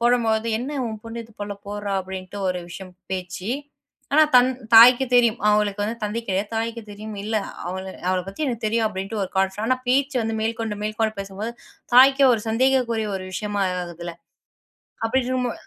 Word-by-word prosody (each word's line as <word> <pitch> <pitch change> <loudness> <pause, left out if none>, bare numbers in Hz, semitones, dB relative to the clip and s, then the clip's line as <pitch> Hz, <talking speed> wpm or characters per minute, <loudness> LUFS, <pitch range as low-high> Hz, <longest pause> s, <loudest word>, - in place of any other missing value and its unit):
போடும்பொழுது 230 -2 +2
என்ன 275 +5 -4
உன் 220 -2 -6
பொண்ணு 230 +1 -6
இது 225 - -19
போல 205 0 -4
போடுறா 205 -1 -4
அப்டின்னுட்டு 190 +1 -7
ஒரு 180 -1 -2
விஷயம் 185 0 -9 0.2
பேச்சு 185 +2 -4 0.6
ஆனா 310 - +7
தன் 250 0 +7 0.3
தாய்க்கு 245 +3 +9
தெரியும். 235 -2 +5
அவளுக்கு 210 -1 +2
வந்து 220 +3 -2
தந்தை 210 +2 -2
கிடையாது. 195 +2 0
தாய்க்கு 230 +1 -2
தெரியும். 215 +1 -8
இல்ல 215 +2 -1 0.3
அவள 185 +1 -4 0.3
அவளப் 185 -1 -1
பத்தி 195 +10 -6
எனக்குத் 240 -4 -3
தெரியும் 225 +1 +1
அப்டின்னுட்டு 200 +1 -4
ஒரு 185 - -9
கான்ஃபிடன்ஸ் 195 +2 0
ஆனா 255 +2 +2
பேச்சு 270 +2 +2
வந்து 225 0 -2
மேற்கொண்டு 225 -1 -2
மேற்கொண்டு 215 +1 -1
பேசும்போது 200 +3 -5 0.4
தாய்க்கு 270 +2 +7
ஒரு 225 - -2
சந்தேகக்குரிய 235 -2 +1
ஒரு 185 - -6
விஷயமா 205 +1 -2 0.2
ஆகுதுல்ல. 170 0 -7 0.9
அப்டி 260 +4 +2
இருக்கும்போ 250 -1 -1
220 Hz, 170 wpm, -23 LUFS, 195-235 Hz, 0.9 s, தாய்க்கு